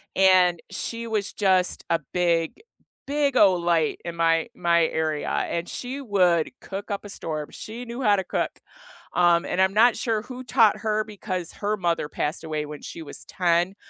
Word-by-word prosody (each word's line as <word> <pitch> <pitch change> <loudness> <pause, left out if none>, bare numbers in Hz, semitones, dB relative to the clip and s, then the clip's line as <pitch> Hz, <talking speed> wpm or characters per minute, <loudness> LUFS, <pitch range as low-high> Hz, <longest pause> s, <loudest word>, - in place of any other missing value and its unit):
and 185 -2 +5
she 230 0 -4
was 210 -3 -2
just 185 -3 +1
a 165 - +3 0.2
big, 170 - +1 0.5
big 285 -2 +1
ol' 185 -3 +5
light 170 -3 +1
in 170 -1 -5
my 165 -1 +2
my 170 -1 +3
area, 155 -2 -2
and 170 +1 -2
she 260 +3 -5
would 180 - +2
cook 195 +1 -7
up 200 +1 -3
a - - -8
storm; 155 -6 -4
she 235 +3 -8
knew 235 +2 -6
how 210 -5 +4
to 190 - -1
cook, - - -3 0.5
um, 175 0 +4
and 185 - 0
I'm 190 0 +3
not 235 +2 +6
sure 220 -3 -1
who 255 +1 -8
taught 225 -3 +4
her 215 0 0
because 185 -5 -5
her 210 +1 -2
mother 170 -5 -1
passed 155 +3 -2
away 155 -2 -3
when 150 0 -9
she - - -8
was 150 - -7
10, 175 +1 +1
185 Hz, 180 wpm, -25 LUFS, 170-215 Hz, 0.5 s, not